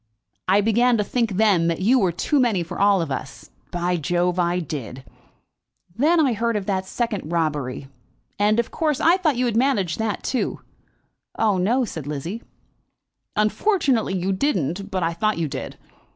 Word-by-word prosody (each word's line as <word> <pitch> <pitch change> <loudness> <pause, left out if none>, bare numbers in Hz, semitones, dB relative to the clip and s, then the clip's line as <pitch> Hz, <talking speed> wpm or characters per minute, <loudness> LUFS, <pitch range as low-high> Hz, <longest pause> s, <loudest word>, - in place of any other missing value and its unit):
I 195 +3 +4
began 235 +3 +3
to 210 - +1
think 230 0 -1
then 190 -4 +3
that 170 0 0
you 240 +8 +4
were 190 -5 +2
too 280 - 0
many 225 -9 +2
for 165 - -7
all 200 -3 +4
of 150 - -6
us. 130 0 -6 0.2
By 175 0 -1
Jove, 175 +3 0
I 175 0 +1
did! 135 - -6 0.9
Then 310 +9 +3
I 275 -6 +3
heard 230 +1 -1
of 200 - -4
the 190 -2 0
second 205 -3 -3
robbery, 150 -5 -2 0.5
and, 210 +2 +3
of 235 - -1
course, 305 -4 0
I 340 +3 +4
thought 320 -7 +1
you 250 - +1
had 235 -3 -1
managed 225 -9 +1
that 220 -2 -2
too." 255 - -2 0.8
"Oh, 210 -4 +2
no," 240 +8 +2
said 160 -9 -7
Lizzie 165 +10 -4 0.9
"Unfortunately 240 - +1
you 185 +2 -1
didn't; 190 - -1
but 185 -3 -2
I 165 +1 0
thought 215 +5 0
you 165 -2 -1
did. 140 -1 -6
200 Hz, 175 wpm, -23 LUFS, 170-235 Hz, 0.9 s, I